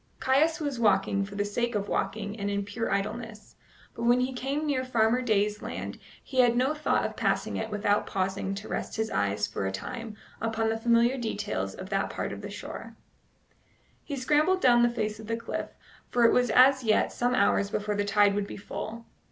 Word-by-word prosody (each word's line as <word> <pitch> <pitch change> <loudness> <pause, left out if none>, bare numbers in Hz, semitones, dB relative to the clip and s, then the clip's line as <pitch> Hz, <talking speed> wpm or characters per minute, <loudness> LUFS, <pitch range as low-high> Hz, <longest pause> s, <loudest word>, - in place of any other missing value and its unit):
Caius 305 +6 +2
was 285 -5 -3
walking 200 -2 +2
for 200 0 -10
the 205 0 0
sake 235 +3 -1
of 200 -1 -1
walking 205 0 -2
and 200 0 -1
in 200 0 -1
pure 225 +3 -3
idleness, 215 +2 -4 0.4
but - - -8
when 240 +1 +4
he 260 +1 -1
came 275 +4 -2
near 275 -3 0
Farmer 240 -1 +2
Day's 210 -3 +1
land - - -6 0.2
he 260 - -3
had 240 -1 +5
no 260 +4 +2
thought 305 0 0
of - - -4
passing - - 0
it 220 - -3
without 205 -1 +1
pausing 190 0 -2
to 200 +2 -7
rest - - -4
his 220 0 -2
eyes 100 0 0
for 95 - -3
a - - -2
time 225 - -6 0.3
upon 225 0 0
the 225 0 -1
familiar 235 +3 +3
details 230 -2 -3
of - - -8
that - - 0
part - - -4
of - - -8
the - - -6
shore. - - -8 1.1
He 285 - -5
scrambled 300 +8 +2
down 240 -6 +5
the 240 - +5
face 215 -3 -3
of 220 - -10
the 230 0 -1
cliff, 230 - -4 0.4
for 240 -1 +3
it 230 - +5
was 245 -1 +3
as 260 +2 +6
yet 215 -2 +2
some 245 +1 0
hours 200 -2 +2
before 210 0 -2
the 205 0 0
tide 205 0 +4
would 200 0 -1
be - - -7
full. 220 +3 -6
225 Hz, 210 wpm, -28 LUFS, 205-250 Hz, 1.1 s, as